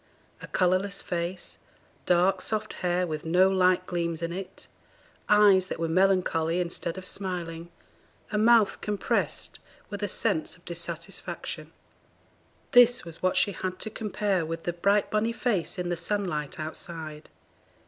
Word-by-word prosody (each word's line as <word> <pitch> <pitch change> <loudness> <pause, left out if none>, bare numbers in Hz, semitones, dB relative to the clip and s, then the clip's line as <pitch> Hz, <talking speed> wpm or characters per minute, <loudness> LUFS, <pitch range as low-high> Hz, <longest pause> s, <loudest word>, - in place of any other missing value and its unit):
a - - -8
colourless 185 +2 +1
face, 175 0 -4 0.5
dark 180 +2 +3
soft 215 -1 -3
hair 180 0 +1
with 155 -3 -4
no 180 +4 +4
light 185 -1 +3
gleams 170 -2 -2
in 170 0 -2
it, 185 0 -7 0.6
eyes 205 -3 +6
that - - -5
were 165 - 0
melancholy 180 -2 +2
instead 170 0 -3
of 190 - -6
smiling, 170 -3 -5 0.6
a 210 - 0
mouth 225 -1 +4
compressed 210 -1 -1 0.3
with 205 0 -5
a 205 - 0
sense 160 -4 -1
of 180 - -26
dissatisfaction. 170 +1 -6 1.0
This 245 -4 +6
was 165 -1 -7
what 185 0 +1
she 200 - +3
had 185 0 -4
to 220 - -5
compare 205 -4 -1
with 165 +1 -5
the 175 - -2
bright 200 +4 +2
bonny 215 +2 +1
face 215 -7 -1
in 180 -1 -2
the 175 - 0
sunlight 175 -5 -2
outside. 155 -1 -6
180 Hz, 145 wpm, -27 LUFS, 170-200 Hz, 1.0 s, eyes